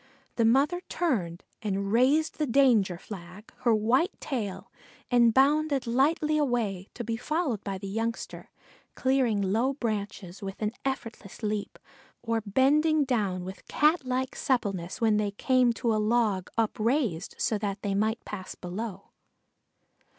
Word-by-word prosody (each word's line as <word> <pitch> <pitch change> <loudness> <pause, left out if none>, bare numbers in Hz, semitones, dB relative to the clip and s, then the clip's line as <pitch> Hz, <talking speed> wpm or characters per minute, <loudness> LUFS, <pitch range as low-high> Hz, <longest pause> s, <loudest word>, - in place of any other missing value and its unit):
The 230 - +2
mother 280 +10 +3
turned 195 - -1 0.2
and 200 -1 -2
raised 280 +9 +3
the 300 - +1
danger 230 -8 +4
flag, 190 +2 -10
her 235 -3 +3
white 245 - +1
tail, 220 -9 -4 0.4
and 240 -1 +5
bounded 280 +2 +3
lightly 300 +5 +2
away, 225 -9 -1
to 240 - -4
be 230 0 -2
followed 290 - -1
by 195 -2 -3
the 195 +1 -7
youngster, 225 +3 -4 0.5
clearing 255 -6 +2
low 230 +8 +1
trunks 205 -4 -4
with 195 -1 -6
an 215 -1 -1
effortless 230 -5 -5
leap, 210 -1 -2 0.5
or 230 -1 0
bending 295 +8 +3
down 205 -9 -1
with 190 +1 -9
catlike 260 -4 +1
suppleness 195 -9 -1
when 220 -2 +3
they 210 -1 +1
came 250 +4 +2
to 230 -1 0
a 215 - +1
log 210 -4 +1
upraised 225 - 0
so 215 - 0
that 200 -1 -3
they 200 -2 0
might 220 +3 0
pass 190 -3 -7
below. 195 +2 -6
225 Hz, 140 wpm, -28 LUFS, 200-265 Hz, 0.5 s, and